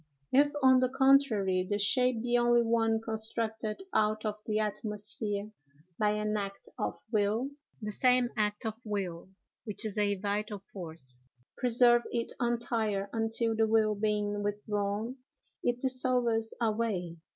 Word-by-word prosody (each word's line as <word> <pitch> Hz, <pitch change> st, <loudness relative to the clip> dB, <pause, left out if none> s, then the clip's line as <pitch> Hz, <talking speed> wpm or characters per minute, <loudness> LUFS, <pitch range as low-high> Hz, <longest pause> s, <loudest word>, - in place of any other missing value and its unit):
If, 290 Hz, +2 st, +5 dB
on 260 Hz, -1 st, +7 dB
the 255 Hz, 0 st, +2 dB
contrary, 265 Hz, -9 st, +3 dB
the 205 Hz, -, +1 dB
shape 245 Hz, +3 st, +2 dB
be 245 Hz, 0 st, +1 dB
only 240 Hz, 0 st, +4 dB
one 225 Hz, -1 st, +1 dB
constructed 220 Hz, -, -1 dB
out 215 Hz, +1 st, +1 dB
of 210 Hz, 0 st, -3 dB
the 215 Hz, -1 st, 0 dB
atmosphere 210 Hz, 0 st, -2 dB, 0.5 s
by 210 Hz, -1 st, +3 dB
an 210 Hz, 0 st, -1 dB
act 200 Hz, -1 st, -4 dB
of -, -, -1 dB, 0.2 s
will, 220 Hz, +5 st, +1 dB, 0.3 s
the 210 Hz, -, -2 dB
same 250 Hz, +2 st, +3 dB
act 210 Hz, 0 st, -1 dB
of 220 Hz, -, -1 dB
will, 190 Hz, -5 st, -4 dB, 0.3 s
which 215 Hz, -1 st, -4 dB
is 215 Hz, -1 st, -2 dB
a 205 Hz, -1 st, +2 dB
vital 205 Hz, +1 st, -3 dB
force, 160 Hz, -9 st, -6 dB
will 130 Hz, -, -36 dB, 0.3 s
preserve 240 Hz, -1 st, +5 dB
it 235 Hz, -1 st, -2 dB
entire, 225 Hz, -4 st, -1 dB
until, 225 Hz, 0 st, +1 dB
the 220 Hz, 0 st, +2 dB
will 215 Hz, -1 st, +3 dB
being 205 Hz, 0 st, -1 dB
withdrawn, 205 Hz, +3 st, -2 dB, 0.4 s
it 245 Hz, 0 st, 0 dB
dissolves 250 Hz, -3 st, +1 dB
away. 215 Hz, -7 st, -1 dB
215 Hz, 140 wpm, -30 LUFS, 205-240 Hz, 0.5 s, on